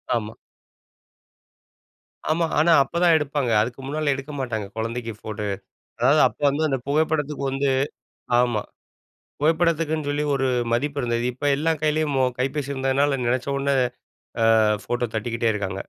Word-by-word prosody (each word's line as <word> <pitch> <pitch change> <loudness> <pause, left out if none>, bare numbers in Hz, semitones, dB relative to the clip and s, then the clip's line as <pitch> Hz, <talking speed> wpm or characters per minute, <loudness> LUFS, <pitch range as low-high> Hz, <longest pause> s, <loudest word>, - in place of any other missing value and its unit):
ஆமா. 110 -1 -3 2.0
ஆமா. 165 +1 +2
ஆனா, 170 +2 +4
அப்பதான் 170 +4 +2
எடுப்பாங்க. 140 -4 -1
அதுக்கு 120 +4 -3
முன்னால 150 +1 0
எடுக்க 135 +2 -7
மாட்டாங்க. 110 -5 -2
குழந்தைக்கு 115 0 -3
ஃபோட்டோ. 105 -1 -5 0.5
அதாது 140 +6 +4
அப்போ - - -17
வந்து 145 +3 -1
அந்த 135 -2 0
புகைப்படத்துக்கு 150 -1 0
வந்து 135 +1 0 0.7
ஆமா, 120 -4 +1 0.8
புகைப்படத்துக்குன்னு 160 -1 +1
சொல்லி 145 +1 0
ஒரு 135 -1 0 0.3
மதிப்பு 140 +4 0
இருந்தது 120 -1 -1
இப்போ 145 +4 -4
எல்லா 160 +3 0
கையிலேயும் 155 -1 +1
மொ 130 - +3 0.2
கைப்பேசி 135 +2 -2
இருந்ததுனால 135 +1 +1
நனச்ச 125 +2 0
உடனே 140 0 0 0.9
அ - - +4 0.2
ஃபோட்டோ 120 0 -1
தட்டிக்கிட்டே 115 +1 0
இருக்காங்க 100 -2 -3
135 Hz, 130 wpm, -23 LUFS, 120-150 Hz, 2.0 s, ஆனா